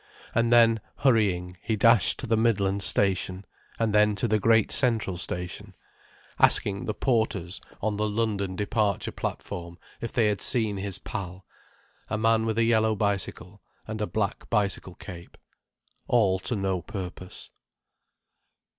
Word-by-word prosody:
And 115 0 +1
then, 115 -2 +5 0.2
hurrying, 95 -8 +1
he 110 - -1
dashed 115 -1 +5
to - - -4
the 115 -1 +1
Midland 100 -3 +1
Station, 95 -1 +1 0.3
and 115 -2 0
then 105 0 +4
to 100 - -1
the 110 -1 +1
Great 110 +1 +3
Central 115 -7 +2
Station, 90 +3 -5 0.6
asking 100 -1 +3
the 105 - -3
porters 110 -8 -1 0.2
on 105 -1 -1
the 105 0 0
London 105 -3 -2
departure 105 0 -1
platform 85 0 -6 0.2
if 115 - -5
they 115 - +2
had 105 -1 0
seen 110 -4 +2
his 100 -1 -4
pal, 95 -2 -7 0.6
a 110 - -1
man 115 0 +2
with 110 0 -2
a 115 - +3
yellow 110 -1 +2
bicycle, 100 -1 -3 0.3
and 110 0 -5
a 105 - -1
black 105 -1 -3
bicycle 100 -4 -1
cape. 90 -4 -11 0.7
All 100 -6 +2
to 120 +6 -3
no 95 -3 -1
purpose. 90 -2 -8
105 Hz, 145 wpm, -26 LUFS, 95-110 Hz, 0.7 s, then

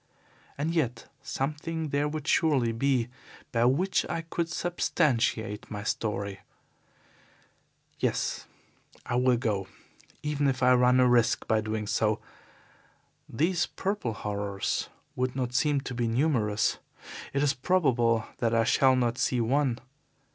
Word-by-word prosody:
And 155 +4 -1
yet 125 -8 -1
something 150 +4 -3
there 145 +1 +1
would 150 -1 -5
surely 135 -8 +3
be 125 0 +1 0.4
by 115 -1 +2
which 170 +10 +2
I 165 - -2
could 165 0 -3
substantiate 130 - 0
my 105 -1 -5
story. 100 -3 -2 1.6
Yes, - - -1 0.6
I - - -3
will 125 -1 +3
go, 105 -6 -1 0.6
even 145 -1 0
if 130 -1 0
I 125 0 +6
run 125 0 +4
a 125 - +5
risk 120 -2 +2
by 110 -1 +2
doing 110 0 -3
so. 105 0 +1 1.1
These 170 +8 +1
purple 195 - -2
horrors 100 -1 -2 0.3
would 130 -1 -1
not 125 -2 -2
seem 145 +2 +2
to 135 - -6
be 120 -1 -1
numerous. 115 -4 +1 0.5
It 140 +1 0
is 145 -1 +3
probable 125 -8 +2
that 115 -1 +1
I 115 - +4
shall 130 +2 +4
not 120 -1 0
see 125 - +1
one. 125 +1 +1
125 Hz, 135 wpm, -28 LUFS, 115-145 Hz, 1.6 s, I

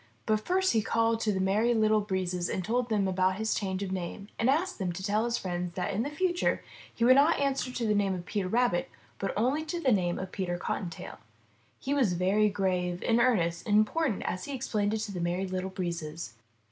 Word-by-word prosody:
But 215 -1 +2
first 375 -2 +2
he 225 - +3
called 225 +1 +1
to 220 -1 +1
the 190 - -1
Merry 210 +5 +2
Little 215 -1 +3
Breezes 185 -3 -2
and 185 - -2
told 240 +2 0
them 205 -3 +1
about 185 0 +1
his 220 +2 -1
change 190 -1 -2
of 190 - -4
name 190 +2 -5
and 230 - +2
asked 340 +5 +1
them 185 -3 -1
to 190 +2 -7
tell 205 +2 +1
all 225 - +1
his 235 0 0
friends 175 -1 -4
that 185 +2 -2
in 200 - 0
the 275 - -2
future 350 +3 0 0.3
he 230 - 0
would 255 - +8
not 290 +5 +5
answer 275 -2 0
to 245 -2 -2
the 210 - +2
name 200 -2 +1
of 175 -1 -7
Peter 200 -2 -2
Rabbit, 230 -3 +1 0.3
but 195 - -1
only 260 +8 +1
to 340 +2 -3
the 270 -6 +2
name 180 -5 +1
of 185 0 -5
Peter 180 -3 -2
Cottontail. 175 -1 -5 0.6
He 275 - -2
was 255 -10 +2
very 195 +4 +2
grave, 180 -3 -1
and 230 0 +3
earnest, 175 -9 +1
and 210 0 +4
important 225 +2 +1
as 185 - -3
he 285 - -5
explained 215 -4 -1
it 220 - -2
to 215 -1 -4
the 180 -3 -4
Merry 175 +2 -1
Little 185 0 -3
Breezes. 170 - -4
205 Hz, 230 wpm, -29 LUFS, 185-235 Hz, 0.6 s, would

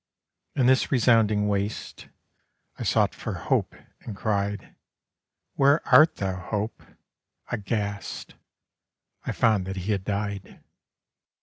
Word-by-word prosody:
In 130 - +2
this 130 +1 +3
resounding 110 -5 +3
Waste 100 +1 -3 0.7
I - - -7
sought - - +2
for - - -5
Hope, - - -1 0.2
and 110 - -8
cried, 100 -1 -2 0.8
'Where 140 +3 +3
art 155 +5 +7
thou, 95 -2 -2
Hope?'—Aghast, 105 0 -5 0.9
I - - 0
found 105 -5 +2
that 95 - -4
he 95 +3 -3
had 100 -2 -1
died. 100 -1 -4
105 Hz, 105 wpm, -26 LUFS, 100-115 Hz, 0.9 s, art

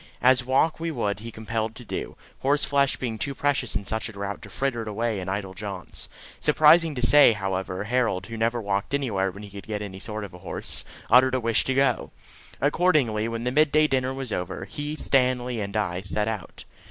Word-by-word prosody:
as 130 0 +5
walk 135 +6 +2
we 165 0 -2
would 105 -10 -1
be 115 +3 -8
compelled 110 0 -3
to 120 - -10
do, - - -5 0.2
horseflesh 140 0 +2
being 115 -4 -4
too 140 +4 -2
precious 140 -4 0
in 100 - -2
such 110 +1 -2
a - - -8
drought 100 -1 -5
to - - -11
fritter 135 -4 -1
it 110 - -6
away 110 0 -1
in 95 0 -5
idle 95 -1 -3
jaunts. 95 -1 -6 0.3
Surprising 155 +1 +5
to 125 -1 +1
say, 145 -2 +7
however, 95 -1 -3
Harold, 115 -4 0
who 115 - -7
never 115 +2 0
walked 100 +4 -1
anywhere 105 -9 0
when 100 +3 -10
he 105 - -9
could 100 0 -10
get 105 -1 -2
any 95 -2 -7
sort 105 +1 -4
of 100 - -8
a 90 - -11
horse, - - -3 0.3
uttered 130 +2 +6
a - - +1
wish 115 -2 +2
to 130 - 0
go. 135 -3 +2 0.5
Accordingly, 145 -8 +2
when 115 0 -4
the 125 - 0
midday 155 +2 +4
dinner 130 -3 +1
was 135 -3 -4
over, 90 -1 -3
he, 145 +1 -4
Stanley, 125 -4 +1
and 100 +1 -3
I 95 -4 -1
set 105 +2 -2
out. 110 -4 -5
115 Hz, 210 wpm, -25 LUFS, 105-135 Hz, 0.5 s, say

